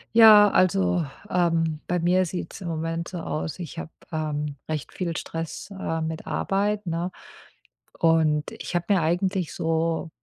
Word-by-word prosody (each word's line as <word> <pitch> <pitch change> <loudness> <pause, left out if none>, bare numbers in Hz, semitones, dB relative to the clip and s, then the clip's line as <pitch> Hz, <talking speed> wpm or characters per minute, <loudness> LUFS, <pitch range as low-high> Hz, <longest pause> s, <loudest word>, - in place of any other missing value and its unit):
Ja, 215 -2 +9
also, 95 - +2 0.2
ähm, 165 -3 +1
bei 180 0 0
mir 180 +2 +3
sieht's 180 +2 -6
im 180 - -5
Moment 165 +1 -3
so 175 -1 -5
aus, 160 +1 -4
ich 170 -1 -7
habe, 160 - -6 0.2
ähm, 150 -2 -2
recht 155 -2 -4
viel 170 -3 -3
Stress, 165 +3 -5
äh, 165 -3 -2
mit 160 0 -4
Arbeit, 205 +1 -1
ne? 170 +2 -2 0.9
Und 160 -2 +3
ich - - -6
habe 175 0 0
mir 195 -3 +4
eigentlich 180 +2 0
so 165 +1 0
165 Hz, 155 wpm, -25 LUFS, 160-180 Hz, 0.9 s, Ja